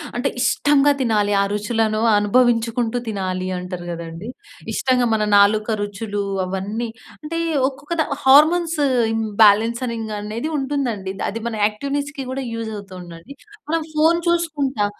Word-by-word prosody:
అంటే 245 - 0
ఇష్టంగా 290 +1 +3
తినాలి. 210 -4 +1
ఆ - - +3
రుచులను 215 +1 0 0.2
అనుభవించుకుంటూ 230 +2 +2
తినాలంటారు 185 -3 -4
కదండీ. 170 +4 -7 0.4
ఇష్టంగా 255 -2 +1
మన 215 -1 +1
నాలుక 210 +1 +4
రుచులు 205 0 -3 0.2
అవన్నీ, 200 +5 -3 0.3
అంటే 330 +2 -3 0.3
ఒక్కొక్క 290 +4 -7
దా - - +1 0.2
హార్మోన్స్ 315 +4 +5 0.4
ఇంబాలెన్స్‌నింగ్ 225 +2 +2
అనేదుంటుందండి, 245 -3 -3 0.2
అది 225 - -5
మన 225 - -5
యాక్టివ్నెస్‌కి 280 +5 -3
కూడా 270 +1 -3
యూజవుతుందండి. 200 -2 -8 0.4
మనం 330 +1 +1
ఫోన్ 320 +2 +3
చూసుకుంటా 295 -10 0
225 Hz, 110 wpm, -20 LUFS, 205-275 Hz, 0.4 s, హార్మోన్స్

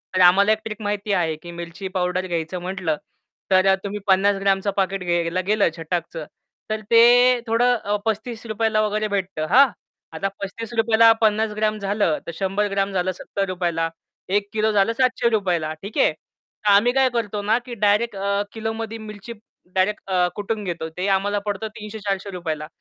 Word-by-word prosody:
तर 185 - +3
आम्हाला 200 +4 +5
एक 220 - +3
ट्रिक 215 0 -6
माहिती 205 0 -2
आहे 165 -4 +1
की 170 +3 -11
मिरची 170 +3 -7
पावडर 180 +1 0
घ्यायचं 170 0 -3
म्हटलं, 180 -4 -2 0.5
तर 185 0 +5
अ, 190 - +6
तुम्ही 205 0 -4
50 195 +1 +4
ग्रॅमचं 195 0 +1
पॅकेट 195 -1 0
घ्यायला 175 0 0
गेलं 210 -3 +3
छटाकचं, 165 -1 -4 0.4
तर 215 0 -2
ते 245 +2 +6
थोडं 240 +2 +3
अ, 210 -2 -2
₹35 225 0 -2
ला 215 - +3
वगैरे 215 +1 -1
भेटतं 190 -6 -2
हां. 275 +2 +7 0.5
आता 195 - -2
₹35 225 +2 -1
ला, 230 0 +9
50 220 0 +2
ग्रॅम 215 0 0
झालं, 200 -5 0
तर - - -3
100 195 +2 0
ग्रॅम 195 0 0
झालं 185 0 0
₹70 185 -2 -3
ला 165 0 0 0.5
1 205 -1 -2
किलो 220 0 +1
झालं 205 +2 +2
₹700 230 -7 +1
ला 155 0 -3
ठीक 200 +2 -8
आहे. - - +4 0.5
तर 210 - +2
आम्ही 205 +5 +5
काय 265 -1 +4
करतो 215 -4 -2
ना 215 +3 +2
की 250 - -7
डायरेक्ट 210 +2 +2
अ, 200 +1 0
किलोमध्ये 225 0 -4
मिरची 215 +1 -9 0.4
डायरेक्ट 190 +3 +1
अ, 180 -1 +3
कुटून 210 +1 -3
घेतो. 170 -4 -4
ते 185 +2 -1
आम्हाला 200 +1 +1
पडतं 205 +1 -2
₹300-₹400 200 -6 -4
ला. 150 - -7
200 Hz, 175 wpm, -22 LUFS, 185-220 Hz, 0.5 s, ला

